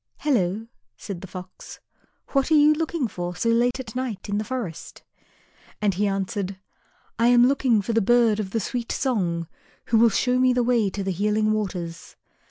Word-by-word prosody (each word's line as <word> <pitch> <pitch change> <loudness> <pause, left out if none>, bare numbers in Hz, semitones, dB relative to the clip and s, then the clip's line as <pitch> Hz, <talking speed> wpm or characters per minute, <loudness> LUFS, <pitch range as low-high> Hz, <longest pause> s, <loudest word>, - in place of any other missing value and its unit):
"Hello," 220 -7 0 0.3
said 190 -4 -7
the 190 - -8
Fox. 185 0 -10 0.5
"What 275 0 +1
are 320 - +4
you 300 0 +6
looking 320 -3 -1
for 175 -3 -5
so 230 +6 0
late 245 +2 +2
at 235 -4 -8
night 250 -7 -4
in 205 0 0
the - - -2
forest?" 220 -8 -6 0.8
And 205 -2 +1
he 205 +3 0
answered, 195 0 -3 0.6
"I 230 - +4
am 245 0 +6
looking 255 -6 +2
for 230 - -2
the 225 - +3
bird 230 0 +3
of 200 -3 -3
the 225 - -1
sweet 235 +3 -3
song, 175 - -1 0.4
who 225 - +4
will 230 0 +6
show 250 +4 +1
me 255 0 +4
the 245 0 +1
way 235 -4 +2
to 195 +1 -4
the 190 - -1
Healing 210 +3 +1
Waters." 180 -6 -4
220 Hz, 185 wpm, -24 LUFS, 195-245 Hz, 0.8 s, you